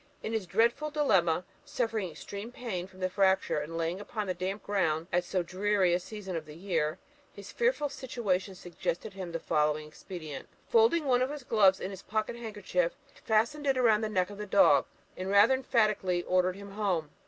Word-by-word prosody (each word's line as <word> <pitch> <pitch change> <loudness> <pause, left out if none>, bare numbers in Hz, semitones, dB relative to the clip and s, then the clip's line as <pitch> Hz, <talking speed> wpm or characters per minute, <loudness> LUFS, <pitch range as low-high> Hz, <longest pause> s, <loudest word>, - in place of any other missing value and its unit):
In 220 - -3
this 220 -5 -2
dreadful 235 - +2
dilemma, 190 - +2 0.2
suffering 225 -6 -2
extreme 200 +7 -8
pain 205 -8 -4
from 190 0 -16
the 185 - +2
fracture, 190 -4 +2
and 160 +3 -5
laying 165 +3 -1
upon 215 0 -4
the 185 - -1
damp 185 +3 -4
ground 165 -6 0
at 175 0 +3
so 180 0 -1
dreary 190 0 +1
a 175 - +2
season 190 -1 -7
of 155 -2 -4
the 150 - -10
year, 165 -4 -1 0.3
his 200 0 -11
fearful 475 -11 +1
situation 225 -9 -2
suggested 175 +3 -4
to 195 - -18
him 180 -2 -5
the 165 - -3
following 150 0 +1
expedient. 155 -2 -8 0.2
Folding 450 -9 +4
one 250 -2 +3
of 255 - +1
his 295 -2 -6
gloves 200 -5 +4
in 190 - -4
his 190 -1 -8
pocket 215 +2 -2
handkerchief, 205 -7 -2 0.2
he - - -19
fastened 235 +7 +1
it 270 -1 +3
round 225 -3 +4
the 215 - -1
neck 185 -2 0
of 205 - -10
the 210 - -5
dog, 165 -8 +5 0.3
and 185 +1 -4
rather 200 +5 +6
emphatically 215 -9 +1
ordered 185 0 +2
him 200 0 -10
'home.' 185 -7 -1
195 Hz, 200 wpm, -30 LUFS, 180-225 Hz, 0.3 s, rather